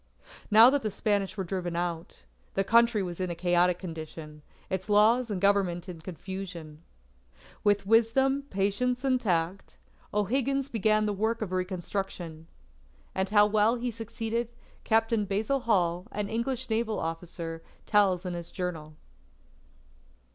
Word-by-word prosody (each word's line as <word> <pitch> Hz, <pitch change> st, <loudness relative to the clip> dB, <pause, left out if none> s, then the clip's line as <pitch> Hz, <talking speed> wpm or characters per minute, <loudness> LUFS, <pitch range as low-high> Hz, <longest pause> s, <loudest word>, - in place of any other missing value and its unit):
Now 225 Hz, +4 st, +8 dB
that 285 Hz, 0 st, +1 dB
the 215 Hz, -, -1 dB
Spanish 205 Hz, 0 st, -1 dB
were 190 Hz, -, -1 dB
driven 175 Hz, -1 st, -3 dB
out, 170 Hz, -1 st, -4 dB, 0.3 s
the 195 Hz, -, +2 dB
Country 230 Hz, 0 st, +4 dB
was 175 Hz, -1 st, -6 dB
in 185 Hz, -1 st, -1 dB
a 170 Hz, -, -3 dB
chaotic 175 Hz, 0 st, +2 dB
condition, 160 Hz, -3 st, -8 dB, 0.3 s
its 190 Hz, +2 st, -4 dB
laws 225 Hz, +4 st, +4 dB
and 200 Hz, -3 st, -2 dB
Government 190 Hz, -3 st, +2 dB
in 175 Hz, -3 st, -8 dB
confusion. 175 Hz, -3 st, -7 dB, 0.8 s
With 205 Hz, -1 st, +2 dB
wisdom, 265 Hz, +6 st, +3 dB
patience, 205 Hz, +6 st, 0 dB
and 260 Hz, -2 st, +2 dB
tact, 180 Hz, -2 st, -1 dB, 0.3 s
O'Higgins 265 Hz, +6 st, 0 dB
began 215 Hz, -1 st, +2 dB
the 210 Hz, -, 0 dB
work 220 Hz, +3 st, -1 dB
of 190 Hz, -, -6 dB
reconstruction. 180 Hz, -3 st, -4 dB, 0.7 s
And 190 Hz, 0 st, -1 dB
how 210 Hz, 0 st, +6 dB
well 215 Hz, +2 st, +3 dB
he 245 Hz, 0 st, -3 dB
succeeded 230 Hz, +1 st, -3 dB, 0.3 s
Captain 225 Hz, -1 st, +2 dB
Basil 210 Hz, +8 st, 0 dB
Hall, 180 Hz, -5 st, +1 dB
an 205 Hz, -1 st, -3 dB
English 235 Hz, +3 st, -2 dB
naval 220 Hz, -1 st, 0 dB
officer, 165 Hz, 0 st, -5 dB, 0.2 s
tells 195 Hz, -3 st, +3 dB
in 180 Hz, -, -3 dB
his 170 Hz, -1 st, -6 dB
journal. 160 Hz, -5 st, -5 dB
200 Hz, 140 wpm, -28 LUFS, 175-225 Hz, 0.8 s, Now